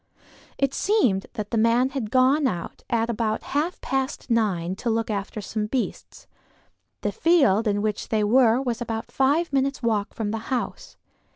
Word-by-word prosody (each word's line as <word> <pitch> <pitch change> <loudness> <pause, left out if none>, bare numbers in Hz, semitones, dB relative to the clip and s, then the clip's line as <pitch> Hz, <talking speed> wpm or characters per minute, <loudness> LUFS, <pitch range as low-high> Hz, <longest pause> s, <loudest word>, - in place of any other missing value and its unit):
It 275 -1 +1
seemed 255 - +1
that 210 -3 -5
the 230 - +1
man 235 +3 +3
had 265 -6 -4
gone 265 +4 +4
out 175 -8 -5
at 230 -1 +1
about 225 -2 -1
half 315 +5 0
past 265 -1 -2
nine 190 -6 +1
to 235 - -2
look 225 0 0
after 205 +1 -4
some 210 +2 -3
beasts. 255 +2 -4 0.8
The - - -1
field 275 - +3
in 205 0 0
which 215 -1 -2
they 215 -1 +1
were 235 +2 +4
was 245 -3 -2
about 225 -1 -4
five 290 +4 +1
minutes' 270 -1 0
walk 220 -3 0
from 210 -2 -2
the 225 - -2
house. 275 - -4
230 Hz, 170 wpm, -24 LUFS, 215-265 Hz, 0.8 s, gone